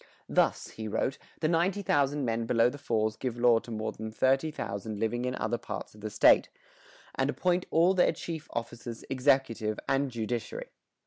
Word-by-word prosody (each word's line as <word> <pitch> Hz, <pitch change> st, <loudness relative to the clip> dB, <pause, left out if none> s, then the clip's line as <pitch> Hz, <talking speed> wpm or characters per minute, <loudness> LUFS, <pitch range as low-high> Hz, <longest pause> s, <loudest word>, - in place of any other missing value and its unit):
"Thus," -, -, +1 dB
he 110 Hz, -1 st, -6 dB
wrote, 130 Hz, +5 st, -1 dB, 0.2 s
"the 155 Hz, -, +2 dB
19,000 165 Hz, -5 st, +1 dB
men 115 Hz, -1 st, -1 dB
below 115 Hz, +1 st, +4 dB
the 145 Hz, -, -9 dB
falls 110 Hz, -4 st, 0 dB
give 125 Hz, -1 st, -4 dB
law 120 Hz, -1 st, +5 dB
to 120 Hz, -, -13 dB
more 110 Hz, -1 st, -3 dB
than 110 Hz, 0 st, -7 dB
30,000 110 Hz, -5 st, -1 dB
living 120 Hz, +3 st, -1 dB
in 125 Hz, 0 st, -1 dB
other 120 Hz, -, -1 dB
parts -, -, -6 dB
of 105 Hz, -, -15 dB
the 110 Hz, -, -4 dB
state, -, -, +5 dB, 0.6 s
and 135 Hz, +1 st, 0 dB
appoint 180 Hz, +3 st, 0 dB
all 170 Hz, +3 st, +4 dB
their 185 Hz, -, +4 dB
chief 160 Hz, -3 st, -6 dB
officers, 115 Hz, 0 st, -6 dB
executive 130 Hz, -5 st, +1 dB
and 135 Hz, 0 st, +1 dB
judiciary." 115 Hz, -1 st, -4 dB
120 Hz, 170 wpm, -29 LUFS, 110-145 Hz, 0.6 s, law